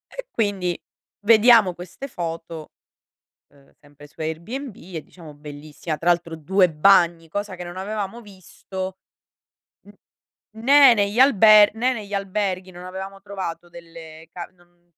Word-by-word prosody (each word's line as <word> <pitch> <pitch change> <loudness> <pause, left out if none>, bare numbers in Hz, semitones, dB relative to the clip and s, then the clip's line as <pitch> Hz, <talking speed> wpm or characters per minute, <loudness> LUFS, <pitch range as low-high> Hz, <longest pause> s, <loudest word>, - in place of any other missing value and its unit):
E - - -8
quindi, 195 -5 -2 0.5
vediamo 225 -3 +6
queste 185 +10 -9
foto, 165 - -7 0.8
ehm, 140 -1 -24
sempre 145 0 -17
su 150 - -22
Airbnb 200 - -5
e 170 -3 -9
diciamo 160 -4 -14
"Bellissima." 150 +2 -7
Tra 170 - -2
l'altro 170 -1 -1
2 180 +3 +2
bagni, 170 0 +3
cosa 205 +1 -5
che 180 - -8
non 175 +1 -9
avevamo 205 +3 -5
visto 190 -2 -9 0.9
n - - -23 0.4
né 275 -2 +7
negli 205 +2 -1
alber 215 -5 +6
né 250 +3 0
negli 210 -4 -8
alberghi, 195 -1 -3
non 175 +1 -11
avevamo 190 +1 -8
trovato 190 -4 -7
delle 165 -1 -13
ca 175 - -8
non 175 0 -30
185 Hz, 135 wpm, -22 LUFS, 165-205 Hz, 0.9 s, né